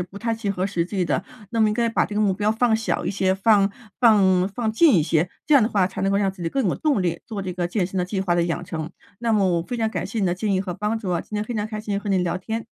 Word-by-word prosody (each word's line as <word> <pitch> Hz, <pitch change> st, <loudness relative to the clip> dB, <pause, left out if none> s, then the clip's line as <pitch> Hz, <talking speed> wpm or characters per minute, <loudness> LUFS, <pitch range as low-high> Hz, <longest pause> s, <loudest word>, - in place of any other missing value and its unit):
不 180 Hz, +2 st, -7 dB
太 230 Hz, +2 st, -2 dB
切 225 Hz, -2 st, -3 dB
合 185 Hz, -2 st, -1 dB
实 175 Hz, -4 st, -1 dB
际 190 Hz, 0 st, -2 dB
的。 -, -, -1 dB, 0.3 s
那 230 Hz, -1 st, -1 dB
么 215 Hz, -, +5 dB
应 210 Hz, -, 0 dB
该 235 Hz, 0 st, +1 dB
把 230 Hz, -, +1 dB
这 205 Hz, -, -7 dB
个 210 Hz, -, +1 dB
目 200 Hz, -2 st, +3 dB
标 210 Hz, +2 st, 0 dB
放 225 Hz, 0 st, +2 dB
小 225 Hz, -, -2 dB
一 -, -, -1 dB
些， 190 Hz, -1 st, +1 dB
放 200 Hz, 0 st, +4 dB, 0.3 s
放 195 Hz, -6 st, +4 dB
放 220 Hz, +2 st, -2 dB
近 280 Hz, +3 st, +5 dB
一 165 Hz, -, +4 dB
些， 165 Hz, +2 st, +1 dB, 0.2 s
这 305 Hz, -, 0 dB
样 280 Hz, -, +8 dB
的 215 Hz, -, +2 dB
话 195 Hz, -5 st, +2 dB
才 190 Hz, -, -7 dB
能 195 Hz, 0 st, +1 dB
够 -, -, +2 dB
让 200 Hz, -1 st, +1 dB
自 185 Hz, -2 st, -10 dB
己 -, -, 0 dB
更 270 Hz, +5 st, -1 dB
有 -, -, 0 dB
动 285 Hz, -10 st, +1 dB
力 170 Hz, -1 st, -1 dB
做 210 Hz, -4 st, -5 dB
这 185 Hz, -1 st, -4 dB
个 175 Hz, -1 st, -2 dB
健 180 Hz, +1 st, -1 dB
身 190 Hz, +1 st, -4 dB
的 180 Hz, -, +1 dB
计 190 Hz, +1 st, -3 dB
划 175 Hz, -2 st, +1 dB
的 170 Hz, -, +2 dB
养 170 Hz, +1 st, -2 dB
成。 160 Hz, -2 st, -5 dB, 0.3 s
那 230 Hz, -1 st, 0 dB
么 205 Hz, -2 st, +3 dB
我 -, -, -2 dB
非 245 Hz, -, -5 dB
常 225 Hz, -1 st, 0 dB
感 -, -, -3 dB
谢 225 Hz, -, -3 dB
你 195 Hz, -, +2 dB
的 175 Hz, -, +1 dB
建 200 Hz, +3 st, -1 dB
议 185 Hz, -, +1 dB
和 185 Hz, -2 st, -4 dB
帮 210 Hz, +4 st, -2 dB
助 200 Hz, -5 st, -4 dB
啊， 170 Hz, -, 0 dB
今 210 Hz, -, -10 dB
天 210 Hz, -, 0 dB
非 215 Hz, -, -5 dB
常 210 Hz, -1 st, -1 dB
开 215 Hz, -1 st, -5 dB
心 205 Hz, -2 st, -2 dB
和 205 Hz, -, -6 dB
你 190 Hz, -1 st, +2 dB
聊 180 Hz, 0 st, -1 dB
天。 220 Hz, +4 st, -4 dB
200 Hz, 355 characters per minute, -23 LUFS, 180-220 Hz, 0.3 s, 样